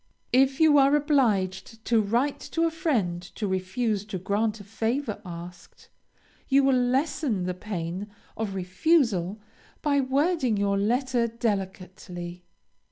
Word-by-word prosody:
If 270 +1 +4
you 310 -3 +6
are 275 +1 +5
obliged 225 - 0
to 230 -2 +3
write 240 +7 0
to 330 - +1
a 330 - +2
friend 220 - 0
to 215 - -3
refuse 195 +3 -1
to 200 -3 -5
grant 210 +4 -1
a - - -9
favor 225 +2 -2
asked, 175 -1 -10 0.6
you 275 0 +4
will 270 0 +4
lessen 250 - 0
the 180 0 -2
pain 180 0 -5 0.3
of 210 -3 -3
refusal 195 - +1 0.4
by 285 -2 +2
wording 270 - +1
your 200 0 +1
letter 240 +3 +1
delicately. 190 -5 -4
220 Hz, 130 wpm, -26 LUFS, 190-270 Hz, 0.6 s, you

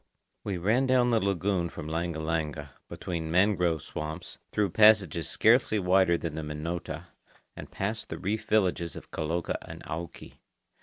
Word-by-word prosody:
We 100 -3 -2
ran 110 +9 +2
down 125 -1 +4
the 115 - +4
lagoon 95 -3 0
from 75 - -8
Langa 85 +1 -2
Langa, 80 -2 -2 0.2
between 80 -2 -4
mangrove 90 -3 +2
swamps, 80 0 -6
through 100 -4 +1
passages 105 -6 +5
scarcely 110 - +4
wider 90 -2 +3
than 80 -2 -4
the 80 - -4
Minota, 75 +3 -5 0.5
and - - -9
past 110 +3 -3
the - - -4
reef 110 +3 -2
villages 90 -7 +1
of - - -11
Kaloka 80 +2 -2
and - - -10
Auki. 85 +2 -7
85 Hz, 150 wpm, -28 LUFS, 80-105 Hz, 0.5 s, passages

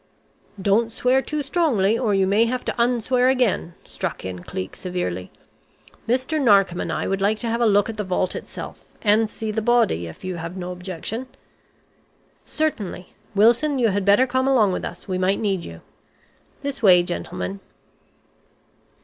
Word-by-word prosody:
"Don't 205 +4 +2
swear 255 +3 +2
too 300 +1 -3
strongly, 265 - +2
or 225 -4 +1
you 195 -1 +3
may 205 +4 +3
have 250 +2 -3
to 235 - -1
'un 240 0 +2
swear' 250 +2 +2
again," 240 -9 +1
struck - - -5
in 90 -1 -6
Cleek, 95 +1 -6
severely. 95 - -4 0.8
"Mr. 260 +5 +1
Narkom 195 -7 +4
and - - -3
I - - -2
would 195 0 -1
like 210 +2 +2
to 235 - -4
have 230 +1 -1
a 235 - +4
look 205 -1 +3
at 225 -1 -6
the 210 - -1
vault 185 -1 -1
itself, - - -8 0.2
and 215 +1 +3
see 220 0 -4
the 220 +1 -1
body, 220 - +2
if 80 - -12
you 185 -1 -4
have 165 +2 -6
no 180 0 -5
objection." 185 +7 -5 1.2
"Certainly. 215 - -3 0.2
Wilson, 240 +8 +4
you 235 -3 +3
had 200 0 0
better 205 +6 +5
come 260 +1 0
along 230 -8 +4
with - - -3
us, 180 - -8
we 185 -1 -2
might 190 +2 +1
need 195 -5 -1
you. 80 0 -10 0.8
This 280 -2 -3
way, 180 -5 +6
gentlemen." 90 - -4
210 Hz, 175 wpm, -22 LUFS, 185-245 Hz, 1.2 s, way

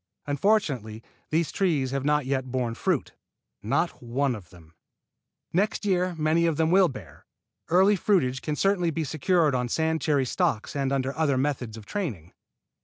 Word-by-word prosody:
Unfortunately 140 - 0 0.3
these 160 +1 0
trees 155 -10 0
have 135 -1 -2
not 150 -1 +1
yet 130 -1 -2
borne 125 -2 -1
fruit, - - -1 0.5
not - - -1
one 130 +3 0
of 100 -7 -9
them. 85 -2 -17 0.8
Next 205 +4 0
year 185 -2 +1
many 160 +2 +2
of 160 -3 0
them 160 0 +2
will 190 0 +6
bear. 135 - -11 0.4
Earlier 190 +4 +4
fruitage 130 -11 +1
can 150 - -2
certainly 190 -1 +1
be 165 0 -2
secured 155 +1 +1
on 125 -1 -1
sand 160 +3 0
cherry 145 -4 +2
stocks 110 -1 -1
and 135 -1 0
under 135 0 -1
other 145 -4 +1
methods 130 -5 -2
of 110 - -11
training. 110 - -5
145 Hz, 165 wpm, -26 LUFS, 130-170 Hz, 0.8 s, will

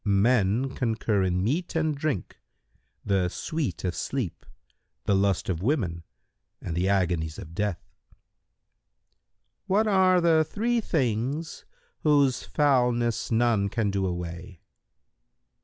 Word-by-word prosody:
"—"Men 110 +3 +2
concur 110 -5 0
in 90 -1 0
meat 165 - -1
and 155 -2 +1
drink, 140 - -3 0.7
the 95 -3 +1
sweet 145 - -3
of 90 -2 -1
sleep, 125 - -4 0.6
the - - +2
lust 95 -1 +1
of 90 -3 -2
women 95 - 0 0.6
and 80 - -5
the 90 +3 +1
agonies 85 -5 0
of 85 -5 -9
death." 105 0 -1 0.3
Q - - -29 1.5
"What 205 +4 +3
are 190 -3 +4
the 165 -2 +4
three 230 +8 -1
things 140 - -2 0.3
whose 140 -4 +3
foulness 125 -5 +1
none 115 -3 +2
can 105 -2 -1
do 95 -1 0
away?" 90 +1 -6
115 Hz, 120 wpm, -26 LUFS, 95-145 Hz, 1.5 s, are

